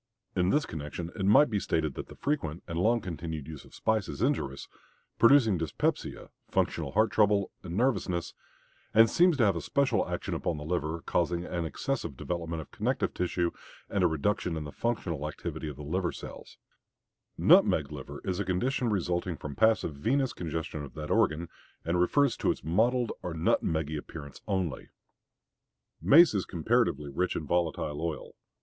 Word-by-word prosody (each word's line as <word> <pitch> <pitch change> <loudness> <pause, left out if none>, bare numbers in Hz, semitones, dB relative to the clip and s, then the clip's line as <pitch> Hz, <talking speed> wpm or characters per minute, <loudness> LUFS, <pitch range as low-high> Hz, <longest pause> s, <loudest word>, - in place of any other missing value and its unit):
In 90 -1 +2
this 145 +7 +2
connection 80 +2 -6
it 95 -3 -1
might 120 +6 +6
be 105 - +1
stated 80 -5 -1
that - - -6
the - - -12
frequent 90 - -2
and 85 0 -3
long 115 +5 +3
continued 80 -4 -5
use 80 -3 -9
of - - -16
spices 110 -3 0
is - - -8
injurious, 75 - -1 0.5
producing 115 -7 +6
dyspepsia, 80 - -2 0.2
functional 70 - 0
heart 110 +3 +3
trouble, 105 -2 +3
and 90 0 -5
nervousness, 100 -8 0 0.6
and 115 +1 +8
seems 175 -3 +4
to 120 - +4
have 100 -3 +3
a 85 - -3
special 140 - +1
action - - -3
upon 85 - -2
the 75 - -6
liver, 80 0 -2
causing 85 0 0
an 85 -2 -3
excessive 85 - -3
development 85 -1 -3
of - - -23
connective - - -1
tissue 90 -1 0 0.4
and 100 - +1
a - - +6
reduction 85 +2 -1
in 80 - -4
the 75 - -7
functional 85 -11 -2
activity 75 +1 -5
of 75 - -7
the 75 - -9
liver 85 +4 -1
cells: - - -10 0.8
"Nutmeg 75 -2 +5
liver" 70 0 -8
is 90 0 -1
a - - +1
condition 120 +7 0
resulting 90 -3 -1
from 70 -1 -7
passive 110 -7 +3
venous 125 - 0
congestion 80 -2 -4
of 65 -3 -10
that 75 -1 -5
organ, 80 +3 +2 0.4
and 85 +1 +1
refers 140 +8 +3
to - - 0
its - - -1
mottled 115 - +2
or 90 -2 -4
nut 80 +1 +2
meggy 80 -1 -1
appearance 75 -1 -10
only. 95 -9 -2 1.1
Mace 165 +1 +7
is 100 -3 0
comparatively 85 - 0
rich 90 +6 -1
in 80 - -3
volatile 80 -2 -1
oil. 80 -2 -4
85 Hz, 175 wpm, -29 LUFS, 80-110 Hz, 1.1 s, and